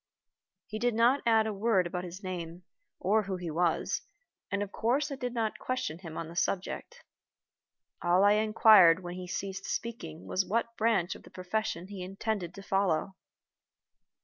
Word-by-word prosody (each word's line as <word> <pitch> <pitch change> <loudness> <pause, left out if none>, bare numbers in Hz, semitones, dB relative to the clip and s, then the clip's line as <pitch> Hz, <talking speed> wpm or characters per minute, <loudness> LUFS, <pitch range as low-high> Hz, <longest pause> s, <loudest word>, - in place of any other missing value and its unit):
He 215 +1 -6
did 240 0 +1
not 240 +5 +4
add 220 -1 +5
a 220 - -2
word 200 -2 +2
about 180 +1 -3
his 180 +3 -9
name, 175 -1 -5 0.4
or 210 +4 +3
who 195 -2 -3
he 175 -3 -5
was, 170 +1 0 0.5
and 200 0 0
of 200 - -7
course 275 +6 0
I - - -2
did 250 -2 -3
not 225 -3 -2
question 255 -9 -3
him 165 -4 -8
on 165 - -4
the 165 - -10
subject. 200 - -2 1.0
All 175 +2 +4
I 205 - +6
inquired 210 -5 +6
when 175 0 -5
he 180 0 -7
ceased 195 +1 -4
speaking 170 -9 -5
was 185 - 0
what 230 +4 -1
branch 220 -6 +1
of - - -12
the - - -15
profession 185 -1 -3
he 195 -1 -8
intended 195 -1 -3
to 195 - -9
follow. 195 -2 0
195 Hz, 175 wpm, -30 LUFS, 180-220 Hz, 1.0 s, I